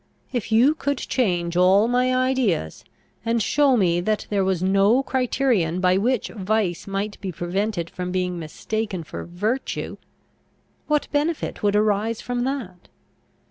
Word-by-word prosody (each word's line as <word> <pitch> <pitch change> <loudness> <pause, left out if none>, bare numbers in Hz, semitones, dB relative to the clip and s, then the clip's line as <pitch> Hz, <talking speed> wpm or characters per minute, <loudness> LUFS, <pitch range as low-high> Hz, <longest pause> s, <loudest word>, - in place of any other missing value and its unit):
If 240 -2 -3
you 245 +7 +5
could 285 -3 -2
change 175 -11 -1
all 190 +4 +5
my 250 +1 +2
ideas, 255 - 0 0.4
and 230 0 +1
show 275 +3 +3
me 175 -4 +2
that 215 +3 -1
there 200 -2 +2
was 190 -2 0
no 200 +7 +4
criterion 250 -10 +1
by 185 0 +3
which 240 +4 0
vice 200 -4 -1
might 200 +1 -3
be 190 -2 -3
prevented 175 +1 -2
from 180 +1 -5
being 180 -1 -1
mistaken 190 +4 -4
for - - -7
virtue, 210 +9 -3 0.9
what 300 -1 +1
benefit 300 +2 -1
would 205 -1 +2
arise 215 +1 +1
from 245 0 -2
that? 235 -10 -5
210 Hz, 140 wpm, -23 LUFS, 180-250 Hz, 0.9 s, you